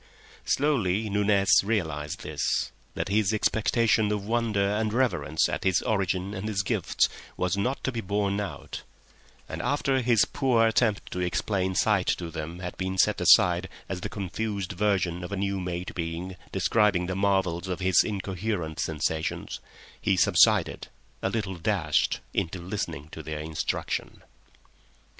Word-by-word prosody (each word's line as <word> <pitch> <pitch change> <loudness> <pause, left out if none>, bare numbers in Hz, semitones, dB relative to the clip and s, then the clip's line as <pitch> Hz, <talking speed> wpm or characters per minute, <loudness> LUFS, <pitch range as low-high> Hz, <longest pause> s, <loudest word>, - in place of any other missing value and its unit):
Slowly 110 -8 +1
Nunez 100 -1 +4
realised 80 -7 -2
this: - - -1 0.2
that - - -2
his 105 0 +2
expectation 110 0 +2
of 105 -1 -2
wonder 110 -3 +1
and 110 0 0
reverence 100 -10 +1
at - - -3
his 95 -2 +3
origin 95 -2 -1
and 105 +1 -4
his 100 -2 0
gifts - - +1 0.3
was 90 -1 0
not 125 +7 -1
to 130 - 0
be 115 -2 -3
borne 100 0 0
out; 100 - -6 0.7
and - - -5
after 135 -2 +1
his 120 -3 +4
poor 125 -5 +2
attempt 110 -2 +1
to 90 - -4
explain 95 +1 -1
sight 100 -2 +2
to 85 -2 -6
them 80 +3 -6
had 90 -1 -5
been 95 0 -3
set - - +3
aside 90 +1 +5 0.2
as 90 -1 -4
the - - -4
confused 100 -1 -3
version 90 -3 0
of 90 - -6
a 100 - -2
new 100 0 -1
made 90 0 -4
being 85 +2 -4 0.2
describing 105 -5 +2
the 95 +1 -3
marvels 95 -3 +1
of 90 -1 -3
his 95 -2 +4
incoherent 95 -4 -3
sensations, 80 0 -2 0.4
he 95 - +2
subsided, - - +4 0.3
a - - 0
little 100 -3 -3
dashed, 85 -5 +1
into 85 +3 -1
listening 85 -5 -4
to 80 - -8
their 80 0 -5
instruction. 80 0 -3
95 Hz, 150 wpm, -27 LUFS, 90-105 Hz, 0.7 s, aside